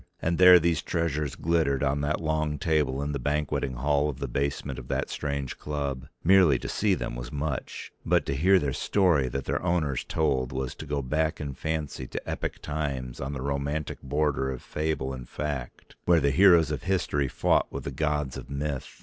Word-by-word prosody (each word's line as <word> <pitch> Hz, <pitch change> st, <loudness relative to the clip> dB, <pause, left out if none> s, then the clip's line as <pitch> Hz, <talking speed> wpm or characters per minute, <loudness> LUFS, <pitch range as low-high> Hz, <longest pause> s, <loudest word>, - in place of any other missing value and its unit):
And 85 Hz, +1 st, -1 dB
there 90 Hz, -1 st, +10 dB
these 85 Hz, -1 st, +1 dB
treasures 75 Hz, -4 st, -1 dB
glittered 80 Hz, -5 st, +1 dB
on 70 Hz, +1 st, +1 dB
that 75 Hz, +1 st, 0 dB
long 80 Hz, -2 st, -1 dB
table 70 Hz, -3 st, +1 dB
in 75 Hz, -, -2 dB
the 70 Hz, -, -2 dB
banqueting 70 Hz, -1 st, -1 dB
hall 70 Hz, +4 st, +1 dB
of 70 Hz, -, -5 dB
the 70 Hz, +1 st, -3 dB
basement 70 Hz, +3 st, -2 dB
of -, -, -10 dB
that -, -, -2 dB
strange 70 Hz, -3 st, -3 dB
club. 70 Hz, -3 st, -3 dB, 0.2 s
Merely 90 Hz, -6 st, +6 dB
to -, -, -6 dB
see 100 Hz, -2 st, +1 dB
them -, -, -4 dB
was -, -, -6 dB
much, 75 Hz, -1 st, -4 dB
but -, -, +2 dB
to -, -, -1 dB
hear 95 Hz, +7 st, +5 dB
their 70 Hz, -6 st, 0 dB
story 85 Hz, -9 st, +2 dB
that 70 Hz, +1 st, -4 dB
their -, -, -1 dB
owners 80 Hz, -7 st, 0 dB
told 70 Hz, -6 st, 0 dB
was 65 Hz, +1 st, -3 dB
to 75 Hz, -, -9 dB
go 70 Hz, -1 st, -1 dB
back 80 Hz, +4 st, 0 dB
in 70 Hz, -2 st, -4 dB
fancy 75 Hz, -3 st, -3 dB
to -, -, -6 dB
epic -, -, -4 dB
times 70 Hz, -5 st, -3 dB
on 70 Hz, +2 st, -3 dB
the 65 Hz, -2 st, -4 dB
romantic 70 Hz, +2 st, -2 dB
border 70 Hz, -1 st, 0 dB
of 65 Hz, -2 st, -5 dB
fable 75 Hz, -4 st, -2 dB
and 65 Hz, -2 st, -8 dB
fact, 70 Hz, -5 st, -5 dB
where 85 Hz, -1 st, +5 dB
the 70 Hz, -1 st, +2 dB
heroes 85 Hz, -1 st, +6 dB
of -, -, -2 dB
history 85 Hz, -7 st, 0 dB
fought -, -, +1 dB
with -, -, -5 dB
the 70 Hz, -, -4 dB
gods 75 Hz, -1 st, -1 dB
of -, -, -9 dB
myth. 70 Hz, -1 st, -3 dB
75 Hz, 200 wpm, -27 LUFS, 70-80 Hz, 0.2 s, there